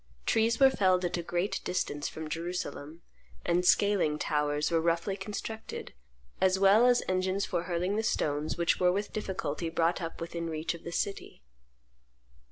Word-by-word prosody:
Trees 225 +1 +2
were 270 -1 +7
felled 185 -5 +2
at 175 - -1
a - - -2
great 175 +3 -2
distance 145 -5 -2
from 160 0 -6
Jerusalem; 165 -1 -5 0.4
and 175 +1 +2
scaling 185 -5 +3
towers 150 0 0
were 165 -1 +2
roughly 170 +3 0
constructed, 210 +3 -6 0.5
as 190 0 +4
well 200 +5 +6
as 245 -1 +4
engines 185 +1 0
for 170 - -2
hurling 180 +3 -1
the - - +2
stones 150 -7 -1
which 170 0 +1
were 180 -1 +4
with 200 +3 -3
difficulty 170 -6 -3
brought 165 +2 +1
up 165 -1 -5
within 170 0 -4
reach 160 +1 -2
of 170 - -11
the 170 - -6
city. 195 - -4
175 Hz, 165 wpm, -30 LUFS, 165-195 Hz, 0.5 s, were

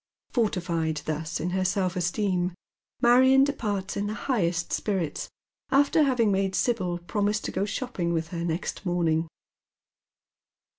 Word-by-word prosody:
Fortified 170 - 0
thus 155 +1 -3
in 175 +3 -2
her 185 +1 0
self 185 -1 0
esteem 180 0 0 0.5
Marion 260 +3 +6
departs 210 -9 -2
in 200 +1 -1
the 215 - -3
highest 175 -11 -1
spirits, 190 -7 -2 0.4
after 280 +3 +4
having 250 -7 +3
made 195 0 0
Sibyl 185 -8 0
promise 205 +4 -1
to - - -4
go 190 +2 0
ghopping 205 -7 -2
with 165 -1 -2
ba 170 -1 -3
next 170 +3 -3
morning. 170 -3 +1
190 Hz, 135 wpm, -27 LUFS, 170-220 Hz, 0.5 s, Marion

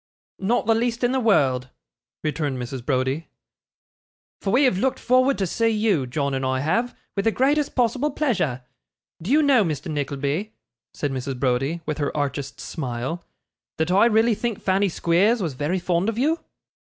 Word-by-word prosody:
'Not 225 +6 +1
the 225 - +4
least 235 +1 -1
in 245 - +3
the 265 - +1
world,' 135 - +2 0.5
returned 150 -3 -1
Mrs. 125 0 -5
Browdie; 130 +4 -1 1.1
'for 195 - -2
we 255 +6 +4
have 220 -9 +3
looked 265 +4 +1
forward 255 +2 +3
to 195 - 0
see 230 +6 0
you 210 - +1
John 140 +1 -1
and 135 0 -2
I 130 0 0
have 230 - 0 0.2
with 200 - -1
the 225 - +4
greatest 285 +5 +1
possible 255 +4 +1
pleasure. 185 - -1 0.6
Do 175 - -6
you 305 +4 +4
know, 270 -6 +5
Mr. 155 -2 -3
Nickleby,' 145 +7 -2 0.4
said 145 - -2
Mrs. 130 0 -4
Browdie, 135 +6 0
with 155 0 -3
her 145 0 -2
archest 140 -1 -3
smile, 135 +2 -4 0.5
'that 160 +2 0
I 195 +5 +5
really 225 +1 +3
think 220 0 -3
Fanny 195 +1 +1
Squeers 185 +8 +2
was 170 -8 -2
very 150 +8 -1
fond 180 +2 0
of 225 - -4
you? 310 +7 +1
175 Hz, 175 wpm, -23 LUFS, 140-230 Hz, 1.1 s, know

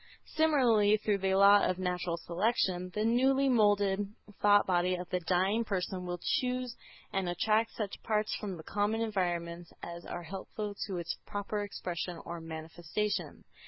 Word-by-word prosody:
Similarly, 245 -10 +4
through 210 -1 0
the 190 0 +1
law 200 +1 +7
of 185 - +1
"natural 180 -2 -1
selection" 180 0 0
the 210 +1 0
newly 265 +4 +3
moulded 205 -4 +2 0.3
thought 205 0 +6
body 180 0 +2
of 180 0 -6
the 180 - +1
dying 185 +6 +1
person 185 -3 -3
will 175 0 -2 0.2
choose 250 -1 -2 0.4
and 190 -2 0
attract 215 +5 +1
such 210 -3 -4
parts 215 -1 0
from 195 -4 -5
the 160 - -10
common 210 +4 0
environments 175 -5 -2
as 170 0 -7
are 175 - -5
helpful 195 +4 -5
to 190 -3 -3
its 170 -1 -4
proper 205 +1 -3
expression 180 -3 -4
or 170 0 -6
manifestation. 165 +5 -4
195 Hz, 155 wpm, -31 LUFS, 175-215 Hz, 0.4 s, law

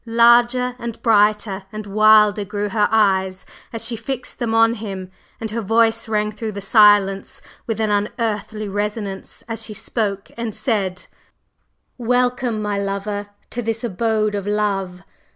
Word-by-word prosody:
Larger 240 +2 +4
and 235 -1 -6
brighter 210 -3 +2
and 215 0 -6
wilder 210 0 +5
grew 205 +1 -3
her 210 +1 +2
eyes 190 -3 +2 0.3
as 230 0 -2
she 235 0 -2
fixed 250 +3 -5
them 225 -2 -1
on 225 0 +5
him, 195 -5 -6 0.3
and 220 -1 -4
her 230 +1 -2
voice 225 +2 +2
rang 210 -1 0
through 215 0 -5
the 200 - -5
silence 200 -2 +4 0.3
with 225 -2 -2
an 215 -1 +1
unearthly 210 0 -2
resonance 205 0 -4
as 225 -1 -4
she 215 -1 -7
spoke 200 -2 -3
and 230 -3 -4
said: 195 -7 -1 0.9
"Welcome, 245 -2 0
my 205 -1 -1
lover, 200 +1 -3 0.2
to 240 - -3
this 225 0 -3
abode 215 0 0
of 200 -1 -3
love! 195 -3 -1
215 Hz, 150 wpm, -20 LUFS, 205-230 Hz, 0.9 s, wilder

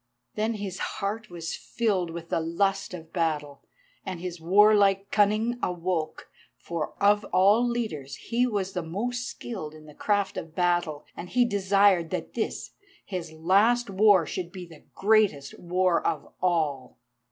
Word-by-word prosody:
Then 220 +2 -1
his 200 -3 -5 0.2
heart 215 +2 -3
was 170 -2 -5
filled 200 -7 -1
with 165 0 -8
the - - +1
lust 170 +5 0
of 165 -2 -12
battle, 150 -4 -1 0.4
and 185 -3 -5
his 175 -1 -6
warlike 200 +2 +4
cunning 215 +4 +2
awoke. 175 -3 -2 0.3
For 165 -3 -4
of 205 +1 +4
all 205 +6 +4
leaders 185 - -3
he 245 +2 0
was 195 -4 -2
the 180 - -2
most 240 +9 -3
skilled 160 -10 -7
in 155 0 -14
the 150 - -13
craft 205 +3 0
of 165 0 -7
battle, 175 -4 0
and 180 - -8
he 245 0 +3
desired 195 -4 +3
that - - -4
this, - - -3 0.3
his 175 -5 -5
last 200 +8 +2
war, 195 -3 +5
should 175 +2 -5
be 185 -2 -8
the 165 -3 -16
greatest 200 -10 +2
war 180 0 +1
of 155 -4 -2
all. 155 -7 0
185 Hz, 155 wpm, -27 LUFS, 165-210 Hz, 0.4 s, war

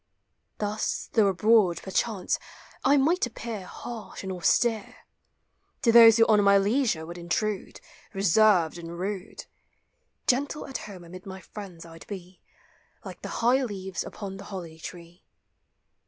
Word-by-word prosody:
Thus, 210 +1 -2
though 220 -3 +5
abroad, 195 -2 +3
perchance, 195 0 -1 0.4
I 280 +2 +5
might 310 +2 +2
appear 225 -5 -7
Harsh 230 -4 -8
and 190 - -4
austere; 215 +4 +1 0.9
To 235 - +5
those 230 -1 +9
who 225 - +6
on 210 -2 +4
my 200 0 +6
leisure 205 - +1
would 170 +2 -8
intrude, 195 +4 -2 0.3
Beserved 195 -3 +3
and 170 0 -8
rude; 195 +2 -5 0.8
Gentle 280 +4 0
at 270 - -5
home 185 -3 -10
amid 180 +3 -11
my 190 0 -7
friends 185 -4 -10
I 165 0 -12
'd - - -14
be, 185 -2 -9 0.6
Like - - -9
the - - -6 0.2
high 255 +3 +5
leaves 190 -5 -4
upon 195 -2 -7
the 195 - -10
holly 170 -5 -8
tree. 170 +1 -10
200 Hz, 140 wpm, -27 LUFS, 180-225 Hz, 0.9 s, those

